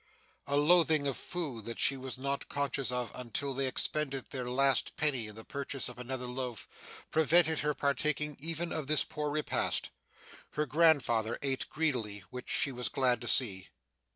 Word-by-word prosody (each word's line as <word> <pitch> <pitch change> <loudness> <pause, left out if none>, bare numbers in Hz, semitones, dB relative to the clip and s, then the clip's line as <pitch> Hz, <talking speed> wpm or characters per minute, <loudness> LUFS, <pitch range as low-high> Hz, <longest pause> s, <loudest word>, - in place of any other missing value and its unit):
A 140 0 +1
loathing 155 -1 +5
of 140 -2 0
food 145 - -4
that 115 - -6
she 135 - +4
was 130 -1 -6
not 140 +1 -3
conscious 140 -2 -1
of 125 -1 -2
until 125 +3 -3
they 135 0 -1
expended 135 0 -2
their 125 -2 -4
last 135 0 +2
penny 135 -7 +1
in 105 - -10
the 110 - -7
purchase 140 -1 -4
of 125 - -11
another 125 0 -4
loaf, 125 -2 -5 0.4
prevented 160 0 +4
her 150 0 0
partaking 150 +1 0
even 165 +3 -3
of 155 -4 -3
this 150 -2 +4
poor 150 0 -3
repast. 150 +1 -1 0.6
Her 150 - 0
grandfather 140 -9 +3
ate 135 -2 -1
greedily, 120 -10 -2
which 125 0 -8
she 140 - +3
was 125 -4 -3
glad 125 -2 +2
to 120 - -6
see. 100 -9 +4
135 Hz, 170 wpm, -31 LUFS, 125-150 Hz, 0.6 s, loathing